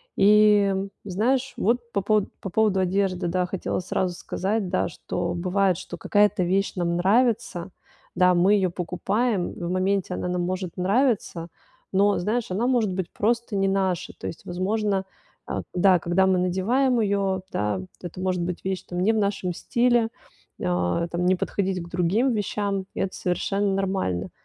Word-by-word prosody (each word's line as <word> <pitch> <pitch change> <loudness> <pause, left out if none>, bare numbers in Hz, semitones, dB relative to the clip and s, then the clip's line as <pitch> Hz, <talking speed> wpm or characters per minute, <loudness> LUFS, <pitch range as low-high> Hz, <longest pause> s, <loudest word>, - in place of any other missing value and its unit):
И, 205 -1 +5 0.3
знаешь, 245 +8 0
вот 235 +2 0
по 200 - +1
пово 210 0 +2
по 195 - -4
поводу 210 -1 +2
одежды, 185 -1 0
да, 180 +1 0
хотела 185 0 -2
сразу 180 0 -2
сказать, 195 +1 -2
да, 185 - +1
что 170 0 -4
бывает, 185 0 +1
что 175 -2 -8
какая-то 205 +1 +2
вещь 195 +3 +1
нам 170 -1 0
нравится. 210 -2 +1 0.4
Да, 180 0 +5
мы 185 +4 +4
её 185 -3 +1
покупаем, 195 +4 -1
в 175 0 -5
моменте 185 0 0
она 180 - -3
нам 180 0 -1
может 185 -1 -3
нравиться, 195 -4 +1 0.5
но, 200 +1 +3
знаешь, 215 +2 -1
она 225 +7 0
может 235 -6 +2
быть 180 -2 -3
просто 235 0 0
не 195 0 +2
наша. 190 -3 0
То - - -7
есть, 165 - -8
возможно, 195 +2 -1 0.4
а, - - -3
да, 185 0 +5
когда 180 +3 +2
мы 185 -1 +3
надеваем 230 +8 +1
её, 195 -3 0
да, 105 -2 -1 0.2
это 175 0 -8
может 180 -2 0
быть 175 0 -4
вещь 190 -1 -2
там 175 0 -5
не 215 +5 +3
в - - 0
нашем 200 -3 -1
стиле, 240 +2 +2 0.5
а, 90 - 0
там 175 +1 -2
не 185 +1 +4
подходить 190 -1 -2
к 170 - -11
другим 195 +9 +1
вещам. 200 -2 -2
Это 190 - -2
совершенно 195 +3 0
нормально. 185 - -1
190 Hz, 165 wpm, -25 LUFS, 180-210 Hz, 0.5 s, И